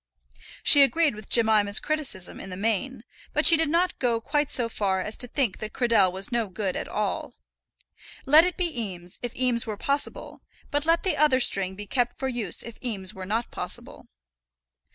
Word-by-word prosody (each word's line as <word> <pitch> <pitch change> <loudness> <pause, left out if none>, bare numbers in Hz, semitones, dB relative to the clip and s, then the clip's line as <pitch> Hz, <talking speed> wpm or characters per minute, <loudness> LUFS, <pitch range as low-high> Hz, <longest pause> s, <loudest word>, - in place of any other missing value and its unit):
She 285 - +8
agreed 310 +1 +3
with 215 -1 -12
Jemima's 215 -3 +4
criticism 285 -12 -2
in 195 - -9
the 180 - -7
main, 225 +4 -2 0.3
but 300 - 0
she 335 - +10
did 320 -1 0
not 345 +3 0
go 235 -3 0
quite 290 +5 -1
so 240 -2 +1
far 195 -4 -2
as 210 +3 -2
to 245 - -1
think 245 -5 -2
that 215 0 -7
Cradell 230 -7 +2
was 190 +4 -1
no 235 -2 -1
good 190 0 -4
at - - -4
all. - - -4 0.9
Let 300 +4 +7
it 360 0 -2
be 335 -9 -2
Eames, 180 -4 -8
if 245 -1 -6
Eames 245 -2 0
were 215 -2 -5
possible; 280 +6 -4 0.3
but 290 +2 -2
let 335 +1 +2
the 375 - -1
other 295 -3 +3
string 195 -6 +1
be 205 +1 -8
kept 245 +3 -1
for 265 - -3
use 230 -8 -1
if 235 -1 -11
Eames 195 -6 -4
were 190 -1 -9
not 225 +4 -3
possible. - - -8
235 Hz, 195 wpm, -25 LUFS, 205-280 Hz, 0.9 s, she